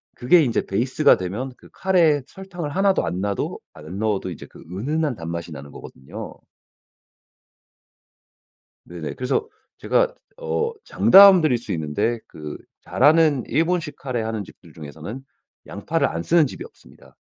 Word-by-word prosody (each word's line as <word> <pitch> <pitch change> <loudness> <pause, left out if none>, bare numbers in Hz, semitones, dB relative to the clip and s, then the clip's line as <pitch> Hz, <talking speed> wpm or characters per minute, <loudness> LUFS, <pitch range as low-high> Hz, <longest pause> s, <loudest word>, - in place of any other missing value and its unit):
그게 155 +7 +4
인제 120 -5 0
베이스가 130 +8 +3
되면 100 +9 -4
그 - - -18
카레에 170 -6 +2
설탕을 190 -5 -7
하나도 195 0 +2
안 90 - -3
놔도 100 0 -3
안 80 +5 -9
넣어도 105 -4 -1
이제 85 - -9
그 - - -15
은은한 145 - -1
단맛이 85 -1 -6
나는 70 -1 -9
거거든요. 65 - -10 2.5
네네. 85 -3 -7
그래서 130 - -1 0.3
제가 - - +1 0.2
어 465 -2 -2
장담 195 -1 +7
드릴 145 -6 +2
수 120 - -8
있는데 80 +9 -1
그 75 -2 -8 0.2
잘하는 150 -4 +3
일본식 165 +3 0
카레 125 -4 -3
하는 110 -1 -3
집들 85 -3 -17
중에서는 80 - -9 0.4
양파를 - - -1
안 85 +1 -4
쓰는 165 - +3
집이 - - -8
없습니다. - - -19
125 Hz, 300 characters per minute, -22 LUFS, -, 2.5 s, 장담